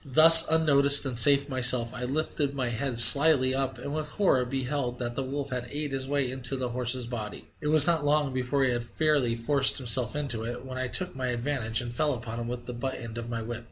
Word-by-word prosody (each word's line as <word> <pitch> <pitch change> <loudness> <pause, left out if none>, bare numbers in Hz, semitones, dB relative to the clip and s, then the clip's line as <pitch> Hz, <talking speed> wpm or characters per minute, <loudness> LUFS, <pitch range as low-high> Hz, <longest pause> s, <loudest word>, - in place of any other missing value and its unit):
Thus 160 +4 +8
unnoticed 140 -3 +3
and 125 -3 -2
safe 140 +3 +5
myself, 125 -3 +2
I 125 - -8
lifted 140 +1 -5
my 130 -3 -5
head 120 +1 -6
slyly 140 0 +7
up, 135 0 -5
and 140 - -9
with 155 -1 -5
horror 185 -8 -1
I - - -5
beheld 130 -1 -6
that 120 -1 -7
the 135 - -6
wolf 140 +1 -8
had 125 -1 -7
ate 145 +1 -7
his 135 0 -6
way 140 -3 -3
into 130 0 -2
the 130 -2 -6
horse's 125 0 -4
body. 115 -3 -10
It - - -7
was 155 -1 +6
not 165 -3 0
long 145 -2 -2
before 130 +2 -4
he 130 - -1
had 120 -1 -5
fairly 140 -2 -3
forced 135 +4 0
himself 125 -1 -2
into 135 -7 -4
it, 120 +2 -9
when 130 -1 -9
I 130 - -5
took 180 +6 -1
my 130 -1 -6
advantage 120 -2 -4
and 120 -1 -9
fell 145 +2 -3
upon 115 0 -10
him 115 - -8
with 120 0 -9
the 125 - -9
butt 130 +2 -7
end 115 -1 -10
of 115 0 -10
my 115 -1 -7
whip. 120 +1 -9
130 Hz, 240 wpm, -24 LUFS, 120-145 Hz, -, Thus